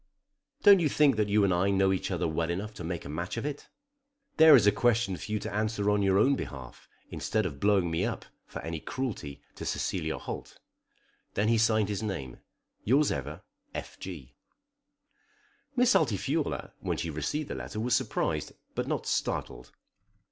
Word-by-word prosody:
"Don't 200 -2 +8
you 160 -3 +2
think 145 -1 +4
that 105 -1 +1
you 105 0 +4
and 95 -2 +3
I 90 +3 +2
know 95 -1 +3
each 95 - -2
other - - -1
well 80 +1 -1
enough 100 +5 -3
to 90 - -8
make 85 +1 -4
a - - -6
match 85 +8 -4
of 115 - -3
it? 145 -1 -5 0.7
There 160 -2 +9
is 115 -7 +5
a 105 - +7
question 115 -2 +2
for 105 - -8
you 105 - +1
to 100 - -5
answer 105 -1 0
on 105 0 +2
your 95 -1 +3
own 135 +7 +4
behalf, - - -8 0.2
instead 110 -1 -1
of 70 -6 -4
blowing 100 -3 +2
me 80 - 0
up - - -3 0.2
for - - -7
any 80 -1 -4
cruelty 100 - -5
to - - -8
Cecilia 80 -4 -2
Holt." - - -7 0.8
Then 105 +2 +2
he 115 -1 +3
signed 110 -2 +3
his 105 -1 -2
name, 85 - -5 0.4
"Yours 140 +6 +3
ever, 70 +3 -5 0.3
F. - - -7
G." 80 -10 -8 1.4
Miss - - +4
Altifiorla - - 0
when - - -2
she 85 - -3
received 145 - -3
the - - -1
letter 110 - -6
was 120 +2 +2
surprised, 130 -4 -1 0.2
but - - -2
not - - -2
startled. 60 - -2
100 Hz, 185 wpm, -29 LUFS, 85-115 Hz, 1.4 s, There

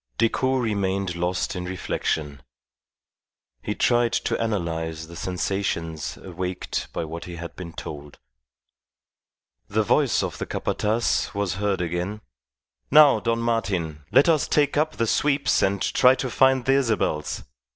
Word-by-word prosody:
Decoud 130 +3 +1
remained 100 -4 -1
lost 90 +2 -1
in 90 0 -4
reflection. 75 -5 -3 1.2
He 105 - -3
tried 120 -1 +2
to - - 0
analyze 80 -7 -2
the 85 +1 -12
sensations 90 -3 -3
awaked 90 0 -4
by 85 - -3
what 80 +2 -7
he 90 -2 -7
had 85 0 -8
been 85 -3 -8
told. 75 -2 -8 1.5
The - - +1
voice - - +2
of - - -4
the - - -4
Capataz 110 -1 0
was 100 -4 -1
heard 100 -3 0
again: 90 +5 -3 0.7
"Now, 150 -1 +7
Don 115 0 0
Martin, 95 -10 -1
let 135 +4 +5
us 160 -4 +3
take 145 -1 +2
up 155 +1 +1
the 115 - 0
sweeps 140 +4 +2
and 100 0 +1
try 125 +7 +4
to 130 -2 -3
find 130 -1 +3
the 135 - +4
Isabels. 110 - -1
95 Hz, 140 wpm, -24 LUFS, 85-120 Hz, 1.5 s, Now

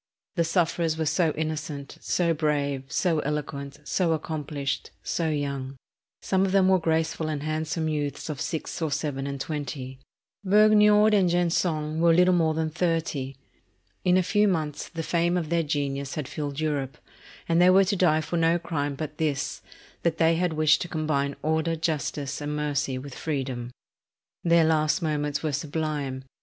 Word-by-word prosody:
The 170 - +1
sufferers 165 -1 +1
were 160 - -1
so 165 +1 +2
innocent, 155 -2 -4
so 170 -2 +1
brave, 145 -3 -1
so 170 -4 +1
eloquent, 140 -1 -4
so 170 +2 +1
accomplished, 150 -3 -3
so 165 -2 -1
young. 140 -3 -3 0.5
Some 190 0 +2
of 195 - +1
them 190 -1 +4
were 190 -1 +5
graceful 160 -1 0
and 150 -2 -3
handsome 160 +1 -2
youths 145 -2 -2
of 150 -3 -4
six 165 +1 -4
or 160 - 0
seven 140 -2 -2
and 140 -1 -4
twenty. 135 -3 -5 0.4
Vergniaud 210 +1 +5
and 190 -4 +4
Gensonne 165 -3 0
were 165 0 +5
little 180 +1 +5
more 160 -3 +2
than 160 0 -1
thirty. 160 -6 -1 0.7
In 180 0 +4
a 185 - +3
few 210 +3 +3
months 155 -6 -2
the 165 -1 -5
fame 170 +2 +1
of 165 -4 -2
their 170 0 +2
genius 140 -3 -2
had 150 -4 -3
filled 145 -1 -4
Europe; 145 -4 -2 0.5
and 170 +1 +3
they 180 - +7
were 190 +1 +6
to 200 +2 0
die 160 -4 +3
for 170 +2 -3
no 165 +1 +3
crime 145 -4 -3
but 150 +1 -6
this, 145 -2 -1 0.4
that 165 -1 0
they 165 +1 +4
had 175 0 0
wished 155 0 +3
to 175 - -3
combine 155 -4 -1
order, 160 +1 +1
justice, 150 -3 -2
and 145 0 -3
mercy 145 -3 -1
with 135 +1 -8
freedom." 130 -6 -3 0.7
Their 170 -1 +5
last 155 +2 +2
moments 150 -2 -1
were 155 - 0
sublime. 145 -3 -3
155 Hz, 170 wpm, -26 LUFS, 145-170 Hz, 0.7 s, they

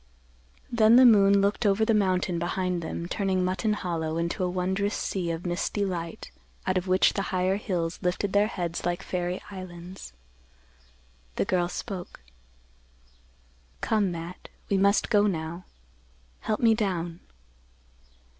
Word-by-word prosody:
Then 225 -1 +5
the 255 +1 +8
moon 200 -3 +6
looked 200 +4 +1
over 210 +1 +3
the 225 - +2
mountain 185 -4 +1
behind 180 0 -1
them 170 +1 -4
turning 190 -1 0
Mutton 185 +3 0
Hollow 165 -5 -2
into 170 +2 -1
a 180 - +1
wondrous 190 +3 -1
sea 180 -3 -2
of 165 +1 -4
misty 180 +3 -1
light 170 -3 -5 0.3
out 185 - +1
of 185 0 -1
which 185 +1 +4
the 200 - -1
higher 185 +1 +1
hills 175 -5 -2
lifted 190 +2 -1
their 205 +1 +4
heads 175 -5 -4
like 175 +1 -1
fairy 180 0 -3
islands. 185 - -9 1.2
The - - 0
girl 175 -1 +1
spoke, 180 - -6 1.6
"Come, 210 -4 +1
Matt; 170 +2 -7 0.2
we 200 - +4
must 200 +4 +3
go 210 -1 +5
now. 170 -1 -4 0.8
Help 215 -1 -2
me 230 -2 +5
down." 175 -6 -2
185 Hz, 140 wpm, -27 LUFS, 175-200 Hz, 1.6 s, the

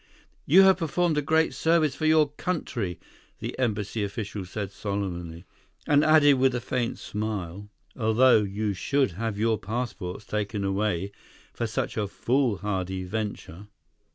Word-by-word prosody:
"You 185 +6 +7
have 190 -1 +6
performed 170 -1 0
a - - 0
great 160 +3 +2
service 160 -3 +2
for 155 - -1
your 155 -2 +4
country," 140 - -3 0.4
the - - -5
embassy 110 -3 -1
official 100 -1 -4
said 100 +1 -5
solemnly, 90 -5 -4 0.4
and 145 0 +4
added 150 -3 +5
with 130 -1 +3
a - - 0
faint 120 0 -2
smile, 105 -2 -5 0.3
"although 115 +1 +4
you 105 +1 -2
should 135 - +1
have 105 +3 -3
your 110 0 +1
passports 105 -3 -4
taken 105 -1 -2
away 100 -1 -1 0.4
for 120 - -2
such 110 - -3
a 105 -2 0
foolhardy 100 -6 -1
venture." 100 -2 -5
110 Hz, 140 wpm, -26 LUFS, 100-135 Hz, 0.4 s, You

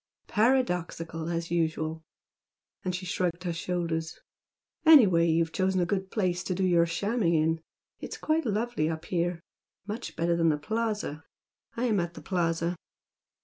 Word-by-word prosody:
"Paradoxical 180 -9 0
as 170 0 -3
usual!" 160 -1 -1 0.8
and 180 -1 -1
she 185 0 -5
shrugged 180 -1 -1
her 175 -2 -1
shoulders 165 -1 -2 0.6
"Anyway 210 - +7
you've 165 0 +2
chosen 185 0 +1
a 175 - +2
good 190 +1 -2
place 180 -4 0
to 185 - -2
do 190 - -1
your 170 -2 +4
shamming 200 +1 +1
in. 160 +1 +1 0.4
It's - - -6
quite 310 -3 0
lovely 215 -6 0
up 160 -1 -4
here, 175 -1 -1 0.4
much 215 +4 -5
better 170 +1 +1
than 165 -1 +3
the 150 - +2
Plaza. 210 -3 -2 0.5
I 240 - 0
am 215 -5 +2
at 170 -1 -3
the - - -9
Plaza." 170 -1 0
175 Hz, 150 wpm, -28 LUFS, 165-200 Hz, 0.8 s, Anyway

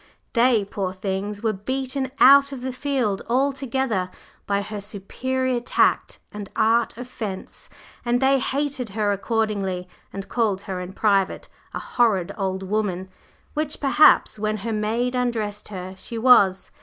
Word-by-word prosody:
They, 235 -3 +3
poor 195 -2 -3
things, 195 +2 -4
were 220 -1 +1
beaten 260 +6 -3
out 280 +1 +7
of 270 -3 -7
the 260 0 -4
field 255 -7 -1
altogether 265 -6 0 0.4
by 200 0 0
her 210 0 -6
superior 250 +6 -2
tact 240 - +1
and 205 -1 -7
art 230 +1 +2
of 245 0 -7
"fence," 205 -6 -7 0.3
and 240 0 +1
they 270 +1 +3
hated 275 -2 -2
her 210 -1 +2
accordingly 200 -3 -1 0.2
and 195 0 -6
called 215 -5 0
her 190 -2 -5
in 180 +1 -7
private 195 -2 +1 0.3
a - - -2
"horrid 200 -7 +1
old 190 -2 -2
woman," 190 -2 -2 0.4
which 305 -1 -2
perhaps, 285 -5 +5
when 215 0 -1
her 230 - -1
maid 225 +4 -1
undressed 225 -5 -2
her, 185 -2 -6
she 230 - -6
was. 220 -6 +4
220 Hz, 145 wpm, -23 LUFS, 195-255 Hz, 0.4 s, out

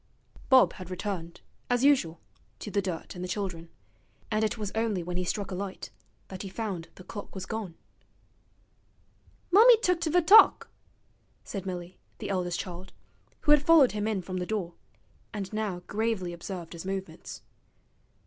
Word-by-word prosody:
Bob 260 -1 +6
had 185 -1 -9
returned, 185 -3 -5 0.3
as 245 0 +2
usual, 210 - +3 0.4
to 210 - -7
the 200 - +1
dirt 180 -4 -5
and 180 - -6
the - - -3
children, 180 -4 -4 0.6
and 215 0 +1
it 215 +1 0
was 210 -2 -4
only 220 -5 0
when 180 +1 -5
he 180 - -1
struck 200 +2 -3
a - - -3
light 190 +1 -5 0.4
that 190 -1 -7
he 195 - -6
found 190 -5 -4
the 185 - -12
clock 205 +2 -9
was 190 -1 -5
gone. 220 -7 -5 1.8
'Mummy 455 +5 +8
tooked 360 -6 +1
ve 340 +3 +3
t'ock,' 390 +6 +7 0.7
said 195 -2 -6
Milly, 180 -1 -6 0.2
the - - -6
eldest 180 -2 -1
child, 180 0 -7 0.5
who 295 - +3
had 295 -1 +7
followed 300 -4 +6
him 210 0 -2
in 205 -4 -1
from 185 +1 -5
the 180 -1 -3
door, 195 -6 -2 0.6
and 195 -1 -5
now 205 -5 -2
gravely 210 -4 -1
observed 170 -1 -7
his 170 - -7
movements. 190 -3 -6
195 Hz, 165 wpm, -28 LUFS, 180-220 Hz, 1.8 s, Mummy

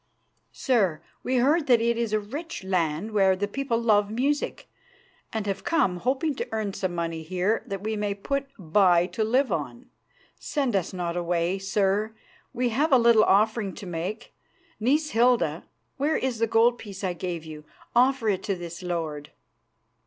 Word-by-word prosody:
"Sir, 185 - +1 0.2
we 260 - -1
heard 290 +6 +3
that 245 -3 +5
it 235 +1 +1
is 230 -2 -2
a 215 - +2
rich 285 - -7
land 180 +1 -1
where 195 -3 +4
the 205 +2 -2
people 240 +1 -1
love 210 -3 +3
music, 275 +7 -1 0.6
and 220 -2 -3
have 195 -1 -3
come 325 - +1
hoping 270 - 0
to - - -3
earn 215 -3 -2
some 185 -2 -3
money 165 -1 -3
here 185 +6 0
that 195 0 -5
we 220 0 -2
may 205 -1 -2
put 275 +7 -2
by 175 -1 +3
to 220 +4 -2
live 250 +2 +2
on. 140 -8 -4 0.5
Send 270 -7 -1
us 190 -4 0
not 175 -2 -3
away, 175 +1 0
sir; 200 +2 0 0.4
we 250 -1 0
have 290 +8 +1
a 265 - +7
little 235 -2 +5
offering 210 0 +2
to 205 - -9
make. 180 +6 -5 0.5
Niece 295 +7 +1
Hilda, 225 -10 +2 0.3
where 295 +3 +1
is 255 -3 -2
the 230 - +2
gold 230 +2 +3
piece 200 -2 -9
I 185 -2 0
gave 170 -2 -5
you? 155 -1 -9 0.3
Offer 250 -2 +3
it 190 -3 -1
to 200 - 0
this 175 0 -8
lord." 160 -5 -4
210 Hz, 175 wpm, -26 LUFS, 180-240 Hz, 0.6 s, a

